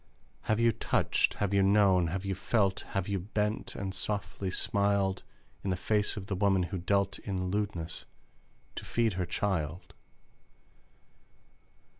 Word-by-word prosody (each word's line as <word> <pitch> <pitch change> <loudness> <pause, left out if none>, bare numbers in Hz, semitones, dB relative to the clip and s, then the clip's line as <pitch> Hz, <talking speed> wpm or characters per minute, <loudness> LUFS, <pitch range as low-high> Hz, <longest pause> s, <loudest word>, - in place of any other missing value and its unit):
Have 110 0 +1
you 115 0 +5
touched, - - +1
have 100 -1 -1
you 100 - +4
known, 95 -3 +4
have 95 +4 -3
you 95 - 0
felt, 95 0 +1 0.2
Have 95 - 0
you 100 -1 0
bent 105 +3 -2
and 95 -1 -4
softly 100 -1 -3
smiled 100 0 +1 0.4
In 100 - -2
the 90 - +1
face 105 +4 0
of 100 - -5
the 100 - -3
woman 95 -1 +3
who 95 +1 -3
dealt 100 +2 +1
In 95 -2 -3
lewdness 95 -5 -3 0.7
to - - -4
feed 115 -3 +1
her 90 -1 -2
child? 85 -2 -2
95 Hz, 145 wpm, -30 LUFS, 95-105 Hz, 0.7 s, you